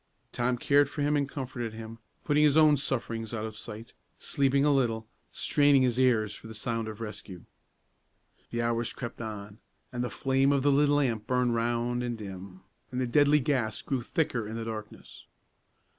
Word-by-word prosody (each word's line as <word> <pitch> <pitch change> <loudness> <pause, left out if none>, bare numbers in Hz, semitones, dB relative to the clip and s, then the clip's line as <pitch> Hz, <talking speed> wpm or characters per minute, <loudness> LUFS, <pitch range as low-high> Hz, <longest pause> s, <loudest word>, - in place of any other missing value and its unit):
Tom 125 +1 0
cared 140 +3 +3
for 145 - -3
him 150 +1 +2
and 140 -1 0
comforted 125 -5 -5
him, 115 +1 -9 0.2
putting 150 0 +3
his 150 0 +4
own 155 -1 +7
sufferings 115 -5 -3
out 110 0 -3
of 110 -1 -7
sight; 110 +2 -8 0.2
sleeping 140 0 +1
a 150 - +4
little, 115 -5 0 0.2
straining 145 -2 +3
his 125 -1 +1
ears 110 -5 +3
for 110 - -11
a 110 - -9
sound 115 +1 -2
of 110 +1 -7
rescue. 100 -5 -8 1.0
The 120 0 -2
hours 115 0 -1
crept 120 -2 -7
on, 105 -1 -7 0.3
and 125 0 -2
the 125 - -2
flame 135 +1 +2
of 140 -2 +2
the 145 - +4
little 145 +1 +4
lamp 120 -7 0
burned 125 -1 +1
round 120 +1 0
and 120 -1 -3
dim, 95 -2 -9 0.3
and 125 - -3
the 130 - +1
deadly 145 +4 +4
gas 125 -6 -1
grew 135 -3 -1
thicker 120 -4 -1
in 110 - -6
the 115 0 -4
darkness. 110 -1 -8
120 Hz, 185 wpm, -29 LUFS, 110-140 Hz, 1.0 s, own